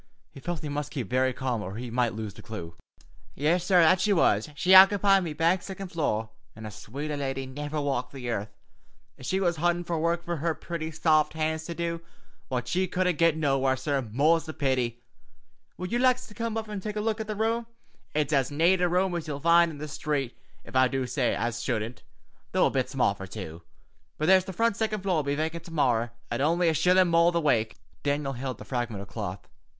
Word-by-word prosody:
He - - -12
felt 170 +1 -4
he 150 - -5
must 145 -1 -3
keep 130 -5 -5
very 130 +1 +2
calm 125 -3 -2
or 95 0 -6
he 120 +1 -6
might 120 -2 0
lose 110 -2 -5
the - - -12
clue. 85 -7 -7 0.6
"Yis, 165 +5 +1
sorr, 180 -1 +5
that 180 +3 +5
she 210 - +2
was. 115 - +2
She 180 +4 +1
ockepied 195 +1 +7
me 165 -4 -3
back 165 +4 +2
siccond 190 -1 -7
floor, 110 -9 -1 0.2
an' 110 0 -9
a 105 - -6
swater 145 +9 -5
lady 135 -1 -3
niver 145 +3 -4
walked 140 -3 -2
the 130 -3 -7
earth, 105 -1 -3 0.7
ef 130 - -8
she 190 - +1
was 175 -3 +1
huntin' 175 +2 +1 0.2
work 170 +1 0
fer 170 -1 -3
her 160 +2 -1
pretty, 165 -2 -5
saft 155 -1 +2
hands 160 0 -2
to 170 - -5
do, 170 0 -3 0.5
what 125 -1 -3
she 185 +8 0
couldn't 180 -2 0
get 165 -2 +4
nowhere, 135 -3 +2
sorr, 140 +1 -1
more's 145 +8 +2
the 155 - -7
pity. 125 -4 -1 0.7
Would 180 +2 -5
yez 240 +1 +1
like 255 -1 +4
to 215 - -12
coom 230 0 -3
up 220 0 -3
an' 210 -1 -5
tak 210 +2 -5
a - - -1
luik 220 +1 -1
at 220 - -4
the 215 - -3
rum? 225 +2 0 0.5
It's 150 0 +1
as 135 -3 +2
nate 170 +5 +3
a 180 - +3
rum 180 +1 +1
as 170 -2 -3
ye'll 145 -2 -4
find 170 +2 +5
in 155 - -8
the 150 - -5
sthreet, 145 -3 -2 0.3
ef - - -12
I 130 0 +5
do 130 0 -2
say 125 -1 0
so - - -4
as 120 0 -2
shouldn't, 110 +3 -3 0.5
though - - +4
a - - +2
bit - - 0
small - - +2
fer - - -9
two. 80 +2 -8 0.6
But 155 - -1
there's 185 +1 +5
the 190 - -5
frunt 230 +3 +1
siccond 215 -3 -1
floor'll 180 -5 +1
be 140 0 -1
vacant 160 +2 -3
to 170 - -10
morry, 120 -7 +1 0.2
at - - -1
only 170 +3 +3
a - - +2
shillun 180 +3 +4
more 170 +1 +5
the 170 - +1
wake." 115 -8 +1 0.2
Daniel 145 -1 -1
held 130 0 -4
up - - -24
the - - -10
fragment 120 -6 -3
of - - -12
cloth. - - -6
155 Hz, 230 wpm, -27 LUFS, 130-175 Hz, 0.7 s, ockepied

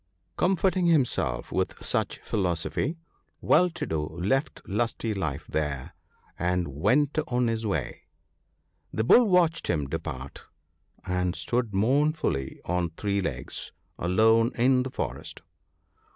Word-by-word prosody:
Comforting 185 -1 +2
himself 125 - +1
with - - -1
such - - 0
philosophy, 95 - -1 0.4
Well 180 0 +4
to 175 - -5
do 80 -1 -1
left 95 - -1
Lusty 115 +1 -1
life 80 -6 -3
there, 75 -4 -3 0.5
and 90 -2 0
went 130 - +2
on 125 0 +1
his 115 -1 -1
way. 100 - -3 0.8
The 110 - -1
Bull 240 - +7
watched 170 -3 +3
him 75 -4 0
depart, 65 0 -6 0.6
and 90 -1 0
stood 120 -4 -1
mournfully 130 - +1
on 90 -1 0
three 100 -1 0
legs, 70 -9 -4 0.3
alone 110 +6 +4
in 125 +2 +4
the 130 - -3
forest. - - -5
110 Hz, 120 wpm, -27 LUFS, 85-135 Hz, 0.8 s, Bull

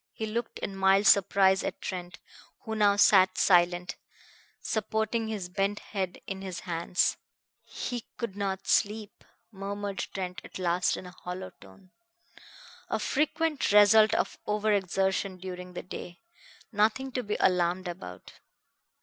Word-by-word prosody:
He 220 - -4
looked 225 +2 -4
in 195 - -5
mild 195 +1 +4
surprise 195 -1 +5
at - - -4
Trent, 180 -2 -6 0.4
who 220 - -5
now 205 -2 +4
sat 190 -2 +5
silent, 175 -1 +3 0.6
supporting 220 +1 -1
his 210 -5 -4
bent 195 +3 -1
head 190 -4 -4
in 190 -1 -5
his 185 -2 -6
hands. 170 0 0 0.5
"He 245 -2 -5
could 235 -6 -4
not 195 -1 -3
sleep!" 210 +2 0 0.3
murmured 200 0 -5
Trent 180 -2 -5
at - - -9
last 175 -1 +1
in - - -8
a 180 - -9
hollow 180 +1 -7
tone. 100 - -17 1.0
"A - - 0
frequent 305 0 0
result 210 +1 +6
of - - -1
over 210 0 +1
exertion 190 0 0
during 180 0 -8
the - - -6
day. 175 -1 -9 0.5
Nothing 225 +5 +1
to 250 - -2
be 210 -3 -3
alarmed 180 0 +2
about." 175 +2 -8
195 Hz, 140 wpm, -28 LUFS, 180-215 Hz, 1.0 s, result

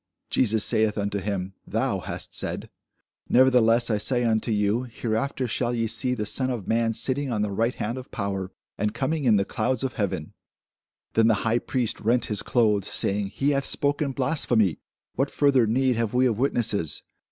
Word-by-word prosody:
Jesus 110 -3 +2
saith 110 -1 +2
unto 100 0 -1
him, 95 -1 -3
Thou - - -1
hast - - -4
said: - - -3 0.6
nevertheless 120 -2 +4
I 105 - +1
say 120 +3 +3
unto 115 0 +1
you, 105 +2 +1
Hereafter 120 +3 -2
shall 120 +1 -1
ye 115 -1 0
see 115 +3 +1
the 105 -3 -3
Son 130 +4 -1
of 120 -7 -4
man 115 0 +1
sitting 135 +3 0
on 105 -3 0
the 105 - -2
right 115 +5 0
hand 115 +5 -3
of 130 - -11
power, 95 -2 -4 0.3
and 105 0 -1
coming 150 +1 -1
in 115 -3 +5
the 100 -1 +2
clouds 130 -1 -1
of 130 -2 -2
heaven. 95 -7 -3 0.8
Then 115 0 +4
the 110 - +4
high 115 +1 +2
priest 120 -2 -2
rent 120 +3 +1
his 105 - -1
clothes, 105 -4 +1
saying, 100 0 0
He 140 +8 -1
hath 140 -1 0
spoken 145 0 0
blasphemy; 125 - +1 0.3
what 135 +2 0
further 135 -5 +3
need 125 +2 +1
have 115 0 -1
we 130 +1 +4
of 115 -3 0
witnesses? 115 - 0
115 Hz, 185 wpm, -25 LUFS, 105-130 Hz, 0.8 s, in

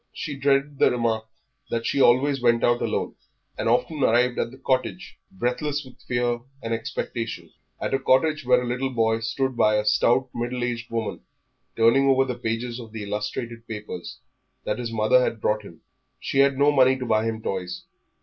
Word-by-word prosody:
She 150 -3 -5
dreaded 140 +1 +1
the - - +6
remark 115 -2 -1 0.4
that 115 0 -2
she 140 - +1
always 135 +2 +4
went 120 -1 +3
out 120 0 +3
alone, - - -1 0.4
and - - -1
often 140 +5 +1
arrived 125 +1 +3
at 115 - 0
the 130 - -13
cottage 130 +6 -2
breathless 145 -3 -2
with 130 - -16
fear 120 -1 -1 0.2
and 115 0 -2
expectation 115 -5 -4 0.3
at - - -3
a 135 - +2
cottage 150 +4 +2
where 125 0 +3
a - - -4
little 125 +2 -1
boy 115 -3 +1
stood 130 +3 -2
by 110 -2 +3
a 105 0 +1
stout 120 +4 +3
middle 120 +1 -3
aged 120 -1 -3
woman, 115 -2 -3 0.6
turning 115 +5 +4
over 135 0 +4
the 125 - -2
pages 120 0 -3
of 115 -2 -10
the 110 -2 -5
illustrated 105 +3 -4
papers 105 -5 -7 0.5
that - - -2
his 120 -2 -4
mother 110 +3 +4
had 115 - -2
brought 105 0 0
him; 85 -6 -14 0.4
she 135 - -1
had 140 -1 +4
no 145 +1 +4
money 130 -2 +4
to 130 - -4
buy 110 -2 +2
him 110 -1 -2
toys. 90 -4 -4
120 Hz, 190 wpm, -24 LUFS, 115-130 Hz, 0.6 s, the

